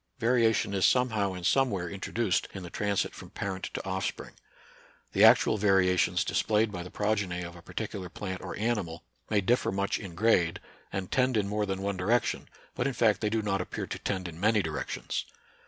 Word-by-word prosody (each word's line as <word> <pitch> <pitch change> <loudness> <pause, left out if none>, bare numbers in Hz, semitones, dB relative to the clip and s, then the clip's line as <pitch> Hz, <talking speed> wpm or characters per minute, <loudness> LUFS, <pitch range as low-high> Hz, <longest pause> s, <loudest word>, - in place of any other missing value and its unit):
Variation 115 -3 +2
is 95 -1 0
somehow 110 -6 +3
and 90 -1 -6
somewhere 100 -10 +2
introduced 100 +2 -1
in 95 - -6
the 85 - -8
transit 100 0 0
from - - -10
parent 95 -2 -4
to - - -4
offspring. 95 0 -3 0.8
The 100 - +3
actual 110 -1 +6
variations 90 -2 +3
displayed 110 0 +1
by 90 -3 -5
the 90 - -8
progeny 100 -4 -1
of 85 0 -8
a 85 - -12
particular 100 -1 -5
plant 95 0 -5
or - - -6
animal 105 -7 -2 0.3
may 105 -2 +2
differ 120 +3 +2
much 100 +1 -1
in 95 -5 -8
grade, 90 -5 +3 0.3
and 95 -2 -4
tend 125 -2 +2
in 100 -2 +1
more 105 0 -1
than 95 0 -3
one 100 -1 -1
direction, 110 +7 0 0.2
but 125 - -1
in 135 - -1
fact 110 -4 +2
they 105 - +1
do 110 0 0
not 95 -2 0
ap - - -7
pear - - -4
to - - -6
tend 95 -2 -2
in 85 -1 -9
many 105 +1 +3
directions. 80 -3 -3
100 Hz, 195 wpm, -29 LUFS, 90-110 Hz, 0.8 s, actual